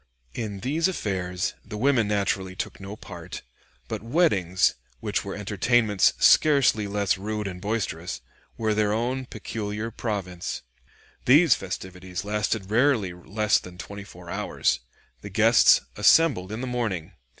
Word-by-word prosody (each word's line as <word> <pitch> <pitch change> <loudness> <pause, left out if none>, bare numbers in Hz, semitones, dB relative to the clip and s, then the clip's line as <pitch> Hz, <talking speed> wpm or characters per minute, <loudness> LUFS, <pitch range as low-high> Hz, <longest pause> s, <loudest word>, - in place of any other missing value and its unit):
In 105 -4 -5
these 155 +7 +1
affairs 95 - -2
the 105 - -7
women 120 -2 +2
naturally 100 -2 -1
took - - -5
no 100 +1 -7
part; 90 -4 -9 0.4
but - - -4
weddings, 105 - +2 0.3
which - - -2
were - - -5
entertainments 105 +1 +2
scarcely 135 -8 +4
less 100 -1 0
rude 105 +1 -3
and 90 -2 -6
boisterous, 95 -5 -3 0.4
were 110 -1 +1
their 105 -1 +1
own 125 +3 -1
peculiar 110 0 -5
province. 95 -6 -4 0.6
These 150 +5 +6
festivities 95 0 -6
lasted 105 -1 -1
rarely 115 -6 +2
less 105 +4 +1
than 90 -1 -12
twenty 100 +2 -8
four 90 -2 -13
hours. - - 0 0.4
The - - -8
guests - - +5
assembled 140 - +4
in 110 +2 -4
the - - -2
morning. 115 -10 -2
105 Hz, 135 wpm, -25 LUFS, 95-115 Hz, 0.6 s, These